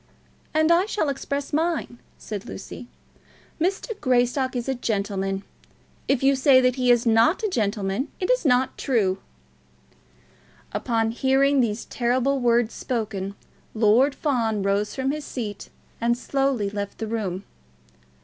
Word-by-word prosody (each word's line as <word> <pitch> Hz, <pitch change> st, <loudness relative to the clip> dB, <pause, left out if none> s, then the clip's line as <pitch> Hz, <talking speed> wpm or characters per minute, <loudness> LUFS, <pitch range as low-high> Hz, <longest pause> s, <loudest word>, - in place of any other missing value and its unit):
"And 315 Hz, +1 st, +3 dB
I 350 Hz, +4 st, +4 dB
shall 415 Hz, -8 st, 0 dB
express 280 Hz, +1 st, -4 dB
mine," 315 Hz, -6 st, -1 dB, 0.2 s
said 205 Hz, -2 st, -7 dB
Lucy. 220 Hz, +5 st, -8 dB, 0.7 s
"Mr. 380 Hz, +7 st, 0 dB
Greystock 255 Hz, +1 st, +1 dB
is 245 Hz, 0 st, -3 dB
a 270 Hz, -, +1 dB
gentleman. 200 Hz, -4 st, -2 dB, 0.6 s
If 270 Hz, -1 st, +1 dB
you 275 Hz, 0 st, +5 dB
say 265 Hz, 0 st, +5 dB
that 255 Hz, -1 st, +2 dB
he 250 Hz, -2 st, +1 dB
is 240 Hz, -1 st, +4 dB
not 230 Hz, -, +3 dB
a -, -, +2 dB
gentleman, 205 Hz, -, -1 dB
it 365 Hz, -, +1 dB
is -, -, +2 dB
not 260 Hz, -3 st, +2 dB
true." 200 Hz, -8 st, +1 dB, 1.5 s
Upon 225 Hz, -2 st, 0 dB
hearing 270 Hz, +3 st, +3 dB
these 225 Hz, -2 st, -1 dB
terrible 255 Hz, +3 st, 0 dB
words 240 Hz, -2 st, +2 dB
spoken, 205 Hz, -5 st, -3 dB, 0.4 s
Lord 235 Hz, +6 st, +4 dB
Fawn 225 Hz, -8 st, 0 dB
rose 200 Hz, +1 st, 0 dB
from 265 Hz, 0 st, 0 dB
his 300 Hz, +1 st, -4 dB
seat 215 Hz, -8 st, -6 dB, 0.3 s
and 235 Hz, +1 st, +2 dB
slowly 265 Hz, -6 st, 0 dB
left 200 Hz, -1 st, -5 dB
the 225 Hz, -, -3 dB
room. 205 Hz, -4 st, -3 dB
245 Hz, 140 wpm, -24 LUFS, 215-275 Hz, 1.5 s, you